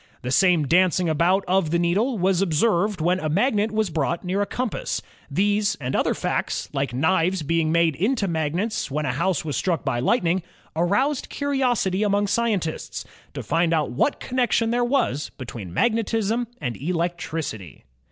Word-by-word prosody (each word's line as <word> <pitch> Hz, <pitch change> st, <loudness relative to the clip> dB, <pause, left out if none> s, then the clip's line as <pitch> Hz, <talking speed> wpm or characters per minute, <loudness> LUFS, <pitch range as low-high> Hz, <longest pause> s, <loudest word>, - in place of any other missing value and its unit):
The 125 Hz, -, -3 dB
same 175 Hz, -1 st, +4 dB
dancing 180 Hz, +2 st, +3 dB
about 170 Hz, +5 st, +2 dB
of 185 Hz, -3 st, +2 dB
the 170 Hz, -, +2 dB
needle 200 Hz, +9 st, +1 dB
was 190 Hz, 0 st, +2 dB
observed 195 Hz, +1 st, +1 dB
when 180 Hz, +3 st, +2 dB
a 155 Hz, -, -2 dB
magnet 210 Hz, -, +1 dB
was 215 Hz, -4 st, 0 dB
brought 165 Hz, +3 st, -1 dB
near 190 Hz, +3 st, 0 dB
a 205 Hz, -, 0 dB
compass. 250 Hz, -3 st, -3 dB, 0.3 s
These 205 Hz, +6 st, +1 dB
and 130 Hz, -1 st, -3 dB
other -, -, +1 dB
facts, -, -, -2 dB
like 140 Hz, -2 st, -1 dB
knives 165 Hz, +6 st, +1 dB
being 160 Hz, +1 st, +1 dB
made 165 Hz, -2 st, +3 dB
into 205 Hz, -, 0 dB
magnets 165 Hz, +5 st, -1 dB
when 150 Hz, +2 st, -2 dB
a 130 Hz, -, 0 dB
house 170 Hz, +3 st, 0 dB
was 150 Hz, -, -2 dB
struck 170 Hz, -3 st, -1 dB
by 130 Hz, -4 st, 0 dB
lightning, 180 Hz, -, +1 dB, 0.3 s
aroused 230 Hz, -, +1 dB
curiosity 250 Hz, -9 st, 0 dB
among 205 Hz, -1 st, +2 dB
scientists, 205 Hz, -6 st, -1 dB, 0.3 s
to -, -, -4 dB
find 165 Hz, 0 st, +1 dB
out 150 Hz, -5 st, 0 dB
what 135 Hz, -, 0 dB
connection 245 Hz, -2 st, +1 dB
there 245 Hz, +1 st, +1 dB
was 240 Hz, -, 0 dB
between 115 Hz, -8 st, -7 dB
magnetism 225 Hz, -, 0 dB
and 125 Hz, -6 st, -3 dB
electricity. 165 Hz, -, -3 dB
180 Hz, 160 wpm, -23 LUFS, 155-210 Hz, 0.3 s, same